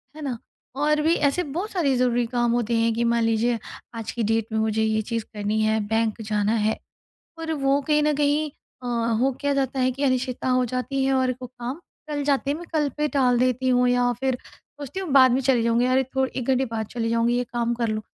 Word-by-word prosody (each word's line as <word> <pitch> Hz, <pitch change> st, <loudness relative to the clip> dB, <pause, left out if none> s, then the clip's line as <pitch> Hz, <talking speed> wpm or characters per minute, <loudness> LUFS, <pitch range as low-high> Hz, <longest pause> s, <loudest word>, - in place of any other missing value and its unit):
है 310 Hz, -, -9 dB
ना? 265 Hz, -5 st, -3 dB, 0.4 s
और 300 Hz, +2 st, +2 dB
भी 320 Hz, +2 st, +3 dB
ऐसे 290 Hz, +4 st, +1 dB
बहुत 350 Hz, +9 st, -4 dB
सारे 300 Hz, -8 st, +1 dB
ज़रूरी 245 Hz, -1 st, +2 dB
काम 240 Hz, 0 st, 0 dB
होते 235 Hz, -1 st, 0 dB
हैं 230 Hz, 0 st, +2 dB
कि 230 Hz, +1 st, -1 dB
मान 235 Hz, 0 st, +2 dB
लीजिए 225 Hz, +1 st, +1 dB, 0.4 s
आज 225 Hz, -1 st, -5 dB
की 235 Hz, -, -2 dB
डेट 225 Hz, +1 st, 0 dB
में 220 Hz, -, 0 dB
मुझे 220 Hz, 0 st, +1 dB
ये 220 Hz, 0 st, +1 dB
चीज़ 230 Hz, +1 st, -3 dB
करनी 210 Hz, +1 st, -1 dB
है, 220 Hz, 0 st, +2 dB
बैंक 225 Hz, 0 st, 0 dB
जाना 210 Hz, 0 st, 0 dB
है। 220 Hz, -, +1 dB, 0.6 s
और 325 Hz, 0 st, -3 dB
वो 275 Hz, -1 st, +1 dB
कहीं 300 Hz, +1 st, +2 dB
न 300 Hz, 0 st, +2 dB
कहीं 295 Hz, +1 st, +1 dB, 0.3 s
अ, -, -, -6 dB
हो 235 Hz, +2 st, +1 dB
क्या 285 Hz, -1 st, 0 dB
जाता 270 Hz, -1 st, -1 dB
है 255 Hz, 0 st, +3 dB
कि 270 Hz, +3 st, -6 dB
अनिश्चितता 255 Hz, -1 st, 0 dB
हो 255 Hz, 0 st, +3 dB
जाती 265 Hz, +2 st, -1 dB
है 270 Hz, -, +2 dB
और 260 Hz, -1 st, +2 dB
वो -, -, -4 dB
काम 245 Hz, +4 st, -7 dB, 0.3 s
टल 295 Hz, -1 st, -2 dB
जाते 275 Hz, -1 st, +1 dB
हैं। 290 Hz, -, 0 dB
मैं 345 Hz, -, -9 dB
कल 300 Hz, -2 st, +1 dB
पे 300 Hz, 0 st, 0 dB
टाल 255 Hz, -4 st, +2 dB
देती 255 Hz, +1 st, +1 dB
हूँ 250 Hz, 0 st, +3 dB
या 245 Hz, 0 st, +2 dB
फ़िर 265 Hz, -2 st, 0 dB
सोचती 290 Hz, +5 st, -9 dB
हूँ 370 Hz, -5 st, -5 dB
बाद 260 Hz, -2 st, +7 dB
में 255 Hz, -, +2 dB
चली 255 Hz, -3 st, +2 dB
जाऊँगी 235 Hz, +1 st, +2 dB
अरे! 260 Hz, +1 st, +3 dB
थोड़ 265 Hz, +1 st, -1 dB
1 255 Hz, -2 st, -5 dB
घंटे 265 Hz, 0 st, +3 dB
बाद 225 Hz, -3 st, -4 dB
चली 230 Hz, +1 st, -3 dB
जाऊँगी 230 Hz, +1 st, +2 dB
ये 245 Hz, -, 0 dB
काम 235 Hz, 0 st, 0 dB
कर 235 Hz, -1 st, -1 dB
लूँ। 215 Hz, 0 st, -2 dB
250 Hz, 240 wpm, -24 LUFS, 230-275 Hz, 0.6 s, बाद